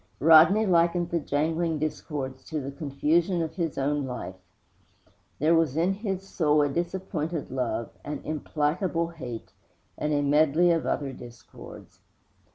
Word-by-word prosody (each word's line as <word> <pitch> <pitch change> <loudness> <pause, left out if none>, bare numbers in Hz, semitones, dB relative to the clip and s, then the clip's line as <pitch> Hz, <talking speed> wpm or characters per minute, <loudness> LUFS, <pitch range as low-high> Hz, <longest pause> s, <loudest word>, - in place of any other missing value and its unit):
Rodney 165 +8 +7
likened 175 -1 +2
the 170 - +1
jangling 160 +3 -1
discords 145 -3 -4
to 155 - -3
the 140 0 -5
confusion 160 +5 0
of 160 - -5
his 165 -5 -3
own 140 0 0
life. 125 -6 -5 1.0
There 155 +3 +3
was 160 -4 +2
in 175 +4 +2
his 195 -2 -4
soul 150 -5 +2
a 145 - +1
disappointed 170 -2 -3
love, 125 -3 -2
an 145 -1 -5
implacable 160 +3 -1
hate, 125 -9 -8 0.5
and 150 - -1
a 145 -1 +1
medley 155 +4 +4
of 165 -1 0
other 135 -1 -2
discords. 120 -1 -13
155 Hz, 140 wpm, -27 LUFS, 145-170 Hz, 1.0 s, Rodney